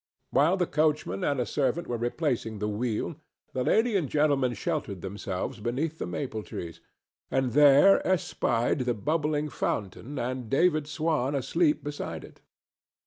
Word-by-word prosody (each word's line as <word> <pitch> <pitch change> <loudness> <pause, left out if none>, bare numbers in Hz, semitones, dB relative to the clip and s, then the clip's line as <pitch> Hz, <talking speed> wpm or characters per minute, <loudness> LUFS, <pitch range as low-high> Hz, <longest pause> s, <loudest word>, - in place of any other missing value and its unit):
While 155 +8 +4
the 180 - +2
coachman 150 - 0
and 140 -2 +1
a 125 - +1
servant 150 +4 0
were 120 - -3
replacing 120 -2 -1
the 105 +1 -2
wheel 115 +7 -2 0.4
the 130 - -1
lady 225 - +2
and 165 -9 +1
gentleman 140 -5 +2
sheltered 100 -2 -3
themselves 100 +4 -4
beneath 140 +9 -2
the - - -3
maple 120 -6 -4
trees, 85 -5 -7 0.5
and 130 -2 0
there 145 - +7
espied 130 -9 +1
the 125 -2 0
bubbling 150 +5 0
fountain 115 +5 -3
and 125 -1 -3
David 155 +1 +2
Swan 150 -3 0
asleep 150 +4 +1
beside 145 0 -5
it. - - -15
135 Hz, 145 wpm, -28 LUFS, 120-155 Hz, 0.5 s, there